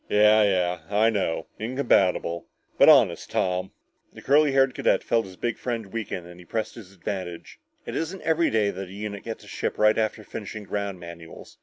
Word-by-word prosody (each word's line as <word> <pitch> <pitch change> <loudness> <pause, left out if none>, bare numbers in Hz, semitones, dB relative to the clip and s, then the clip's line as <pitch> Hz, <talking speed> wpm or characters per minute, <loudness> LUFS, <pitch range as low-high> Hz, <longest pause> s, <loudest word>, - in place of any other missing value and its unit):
"Yeah 105 +1 +5
yeah 90 -3 +2
I 110 +2 +3
know 95 -6 -1
incompatible 105 -8 +1 0.3
but - - +8
honest, - - +5
Tom 90 0 0 0.2
" - - -42
The - - -12
curly 145 +1 +4
haired 135 -1 +3
cadet - - +1
felt 115 -1 +1
his 95 - -12
big 120 +4 -3
friend 115 -5 -4
weaken 105 -6 -4
and 90 0 -12
he 90 - -13
pressed 110 +3 -3
his 105 -6 -12
advantage. 90 -2 -6 0.3
"It - - -5
isn't 170 +4 -3
every 165 +1 +2
day 105 -2 +2
that 95 -1 -7
a - - -11
unit 100 0 -5
gets 115 -1 -6
a - - -15
ship - - -3
right 105 +1 +4
after 110 0 -1
finishing 105 0 -7
ground 100 -2 -4
manuals. 85 -1 -11
105 Hz, 195 wpm, -25 LUFS, 90-115 Hz, 0.3 s, but